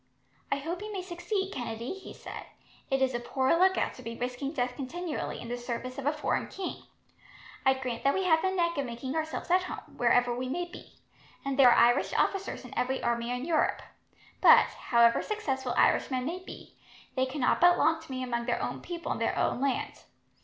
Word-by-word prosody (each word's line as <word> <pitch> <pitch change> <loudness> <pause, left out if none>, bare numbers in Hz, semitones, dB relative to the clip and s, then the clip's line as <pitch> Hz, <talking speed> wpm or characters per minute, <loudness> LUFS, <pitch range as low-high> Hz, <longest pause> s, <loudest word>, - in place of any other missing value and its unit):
"I - - +4
hope 330 +6 -4
you 425 +1 -6
may 385 -3 -4
succeed, 380 +2 -3
Kennedy," 235 +1 -4
he 390 0 -10
said. - - -9 0.4
"It 270 0 +2
is 260 -1 +1
a 240 - -1
poor 260 +3 +1
lookout 375 +2 +3
to - - -12
be 230 0 -6
risking 250 +3 -3
death 250 -4 -2
continually 315 +4 -4
in - - -8
the 245 +1 -4
service 245 +2 -5
of 280 - -3
a - - +4
foreign 300 -1 -1
king. 380 -2 -6 0.8
I 265 - +6
grant 255 -3 -4
that 275 - +3
we 385 - 0
have 320 -3 +4
the 380 - +1
knack 340 -4 0
of 280 - 0
making 240 +3 -5
ourselves 315 +2 -3
at 365 +1 +5
home, 365 - -8
wherever 245 0 +3
we 255 +1 -3
may 350 +6 -1
be, 350 - -13 0.5
and 275 -1 -1
there 255 -2 +9
are - - +5
Irish 240 +3 +2
officers 390 0 0
in - - -10
every 260 +1 -1
army 235 0 0
in 250 +2 -2
Europe; 325 -2 +1 0.6
but, - - +8 0.2
however 235 -1 +5
successful 265 - -2
Irishmen 255 -2 +2
may 345 +5 -3
be, - - -11 0.4
they 260 0 +1
cannot 260 -1 +1
but 350 0 +7
long 325 0 +2
to 320 - -14
be 255 -1 -3
among 235 -1 -2
their 240 - +1
own - - -3
people 345 -1 -5
in - - -2
their - - 0
own - - 0
land. 275 -1 -1
270 Hz, 210 wpm, -29 LUFS, 245-345 Hz, 0.8 s, there